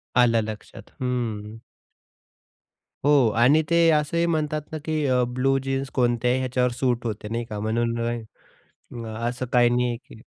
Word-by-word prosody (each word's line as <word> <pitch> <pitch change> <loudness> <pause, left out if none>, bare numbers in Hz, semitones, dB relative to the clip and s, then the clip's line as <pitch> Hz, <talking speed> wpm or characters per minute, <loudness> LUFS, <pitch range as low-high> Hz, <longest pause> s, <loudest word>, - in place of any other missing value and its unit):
आलं 120 -2 +4
लक्षात. 105 -1 -9
हंम्म. 115 -4 -3 1.5
हो 145 - +5 0.3
आणि 135 +7 +5
ते 170 0 +4
असंही 155 +2 +1
म्हणतात 155 -2 0
ना, 160 - -3
की 155 -1 -1
अ 125 -1 +3
ब्लू 130 +2 +1
जीन्स 135 0 -2
कोणत्याही 125 0 +1
ह्याच्यावर 125 -1 0
सूट 120 -1 -1
होते 105 -2 -4
नाही 115 +1 -1
का 105 -1 -4
म्हणून 115 +2 -1 1.2
असं 120 +2 -3
काही 120 -1 +5
नाही 120 0 0
की 115 -2 -16
125 Hz, 140 wpm, -24 LUFS, 115-135 Hz, 1.5 s, हो